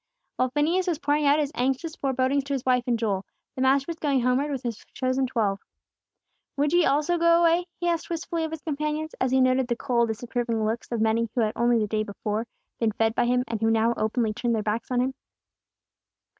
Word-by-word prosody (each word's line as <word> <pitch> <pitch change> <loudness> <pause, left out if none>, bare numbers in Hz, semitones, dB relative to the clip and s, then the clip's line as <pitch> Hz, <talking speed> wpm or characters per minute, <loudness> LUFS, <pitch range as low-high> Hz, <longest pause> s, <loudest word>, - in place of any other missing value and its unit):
While 255 - +2
Phineas 325 +7 +1
was 340 -4 0
pouring 295 -1 +1
out 285 +1 +5
his 295 -2 0
anxious 270 +6 -1
forebodings 270 +1 0
to 280 - -3
his 265 -3 -3
wife 250 -2 +2
and 240 -1 +2
Joel, 205 -4 -1 0.3
the 260 - -4
Master 270 +1 +3
was 335 -1 -5
going 280 -4 +1
homeward 250 +4 +1
with 275 -2 -4
His 235 -3 -4
chosen 260 0 0
twelve. 210 -5 0 1.0
"Would 290 +2 +1
ye 350 -1 +5
also 305 +5 +1
go 335 0 +5
away?" 340 +1 +3
He 350 - -1
asked 335 -1 -1
wistfully 335 0 -3
of 320 - -2
His 320 -1 -7
companions, 305 +1 -2
as 260 - +2
He 265 +1 +3
noted 255 0 +3
the 240 - 0
cold, 240 -2 +1
disapproving 230 0 -2
looks 225 +3 -3
of 235 -2 -1
many 225 +1 +1
who 245 - +2
had 215 -1 +1
only 240 0 +3
the 215 - +1
day 215 +1 -1
before 215 +2 -3 0.3
been 225 -2 +1
fed 225 +1 +1
by 240 - +1
Him, 250 +1 +2
and 225 -2 -4
who 225 - +3
now 225 +1 +3
openly 220 0 0
turned 235 +1 -1
their 215 - -1
backs 215 +2 -2
on 250 -1 +1
Him. 260 +1 -1
255 Hz, 225 wpm, -26 LUFS, 230-295 Hz, 1.0 s, out